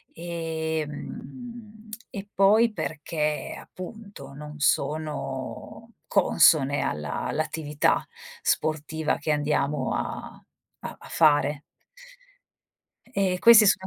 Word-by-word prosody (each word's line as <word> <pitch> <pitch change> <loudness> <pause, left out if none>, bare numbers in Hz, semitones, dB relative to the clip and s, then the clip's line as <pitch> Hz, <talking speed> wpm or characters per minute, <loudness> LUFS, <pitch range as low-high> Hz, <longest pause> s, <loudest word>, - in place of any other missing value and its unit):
ehm, 170 - -5 0.2
e 200 0 -7
poi 215 +4 +5
perché 150 -3 -2
appunto 185 -7 -10
non 150 +1 -9
sono 150 - -2
consone 145 -7 +4
alla 75 -1 -2
all'attività 150 -1 0 0.3
sportiva 155 - 0
che 150 - -5
andiamo 145 0 0
a - - -5 0.4
a - - -6
a - - -13
fare. 145 -2 +3 1.5
E 190 -5 +1
questi 230 0 +9
sono 190 -1 +3
160 Hz, 85 wpm, -26 LUFS, 150-195 Hz, 1.5 s, questi